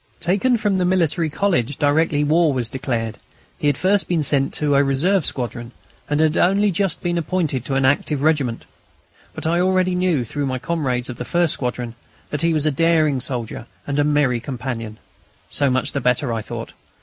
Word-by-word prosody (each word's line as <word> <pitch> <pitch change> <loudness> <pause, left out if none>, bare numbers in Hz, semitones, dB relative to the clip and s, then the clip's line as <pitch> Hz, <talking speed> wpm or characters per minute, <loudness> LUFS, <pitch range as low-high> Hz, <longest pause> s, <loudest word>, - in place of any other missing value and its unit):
Taken 200 +8 +2
from 205 -3 0
the 185 - +1
Military 170 -3 +1
College 145 - 0
directly 145 +1 +2
war 160 +1 +3
was 120 -3 -2
declared, 120 -5 -3 0.4
he 150 - 0
had 145 - +2
first 195 +1 +2
been 170 -4 +1
sent 140 -1 +1
to 150 -1 +1
a 140 0 +5
reserve 155 +7 +2
squadron, 120 -1 -4 0.4
and 145 0 +1
had 155 0 +2
only 200 +3 +3
just 195 +1 -1
been 175 -1 0
appointed 160 -6 -1
to 135 - -2
an 135 0 +2
active 145 +1 +1
regiment. 145 -7 +1 0.7
But - - -5
I 170 +2 +2
already 185 0 +2
knew, 180 -8 +1
through 140 +5 -3
my 130 -1 -2
comrades 130 -5 -2
of 120 - -9
the - - -4
first 170 +4 +1
squadron, 125 -2 -3 0.4
that 150 - -2
he 170 0 +2
was 155 -2 0
a 155 - +3
daring 155 -3 +2
soldier 120 -2 -5 0.2
and 140 0 -1
a - - +4
merry 145 -5 +2
companion. 115 -4 -5 0.5
So 140 -1 +1
much 130 0 0
the 140 - -2
better, 125 0 +1
I 115 - -2
thought. - - -7
145 Hz, 195 wpm, -21 LUFS, 130-170 Hz, 0.7 s, a